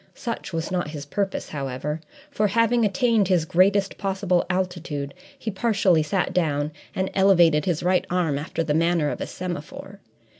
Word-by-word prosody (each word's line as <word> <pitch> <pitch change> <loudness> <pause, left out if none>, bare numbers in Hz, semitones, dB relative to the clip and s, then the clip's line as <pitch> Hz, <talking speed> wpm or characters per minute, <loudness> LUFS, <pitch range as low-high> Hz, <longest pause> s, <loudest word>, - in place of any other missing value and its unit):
Such 235 -4 -5
was 165 0 -3
not 180 -4 -1
his 150 -2 -7
purpose, 195 +6 -2
however, 145 +2 -4 0.3
for, 215 -6 +1
having 230 +3 +2
attained 215 0 +2
his 180 -4 +2
greatest 195 +4 +2
possible 190 -3 0
altitude, 175 -6 -2 0.2
he 220 - -4
partially 195 -5 +2
sat 175 +5 -1
down 150 -4 0 0.2
and 190 0 -1
elevated 175 -6 +4
his 175 -3 -1
right 180 +1 +2
arm 170 -6 0
after 160 +2 -3
the 155 -2 0
manner 165 -1 +2
of - - -6
a - - -3
semaphore. 185 +3 -7
180 Hz, 160 wpm, -24 LUFS, 155-195 Hz, 0.3 s, elevated